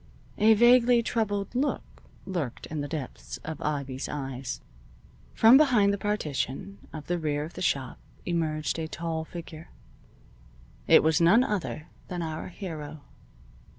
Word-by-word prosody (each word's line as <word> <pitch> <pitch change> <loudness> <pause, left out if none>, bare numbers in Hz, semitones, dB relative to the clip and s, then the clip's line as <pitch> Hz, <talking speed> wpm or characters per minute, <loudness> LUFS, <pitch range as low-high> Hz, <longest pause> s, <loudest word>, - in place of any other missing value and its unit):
A 220 +1 +6
vaguely 240 +1 +5
troubled 205 -4 -1
look 275 +4 -2 0.2
lurked 170 -10 -4
in 155 -1 -4
the 145 - -3
depths 145 -4 -6
of 160 -2 -6
Ivy's 140 -3 -3
eyes. 135 -3 -5 0.8
From 230 +4 +8
behind 240 -9 +4
the - - -1
partition 195 -2 -3
of 155 -2 -8
the 175 0 -1
rear 150 -2 -1
of 160 - -8
the - - -8
shop 135 -7 -1 0.3
emerged 160 -2 -1
a 160 - -3
tall 165 -1 -3
figure. 165 -1 -9 1.2
It - - +7
was 160 +1 +3
none 195 +9 +6
other 190 - -3 0.2
than 175 -2 -4
our 160 -1 -5
hero. 155 -6 -7
165 Hz, 140 wpm, -27 LUFS, 150-205 Hz, 1.2 s, From